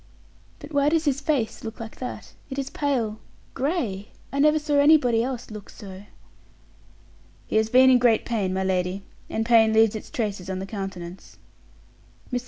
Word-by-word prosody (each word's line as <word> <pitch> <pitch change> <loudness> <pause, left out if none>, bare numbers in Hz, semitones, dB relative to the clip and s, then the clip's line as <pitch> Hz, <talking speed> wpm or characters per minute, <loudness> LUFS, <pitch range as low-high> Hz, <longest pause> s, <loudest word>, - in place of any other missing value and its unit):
"But 295 0 -11
why 285 0 +3
does 325 +1 +1
his 280 -1 +1
face 280 -7 -1
look 225 -1 -7
like 225 -1 -8
that? 250 - -7 0.2
It 265 - -6
is 275 0 -3
pale 240 -7 -1 0.3
gray; 255 - -2 0.3
I 280 - -1
never 300 +2 +5
saw 295 -1 +1
anybody 285 -6 +5
else 245 -2 -4
look 210 -2 -9
so." 195 -1 -11 1.4
"He - - -1
has 220 0 +2
been 260 +2 +6
in 250 - +6
great 240 -2 +3
pain, 205 -6 -1
my 190 0 -1
lady, 185 +1 -1 0.3
and 225 - -2
pain 225 -2 +5
leaves 220 -1 +5
its 215 - -7
traces 200 -5 -3
on 190 - -2
the 190 - -4
countenance." 195 -3 -7 1.0
Mr. 250 - +1
225 Hz, 175 wpm, -24 LUFS, 200-275 Hz, 1.4 s, been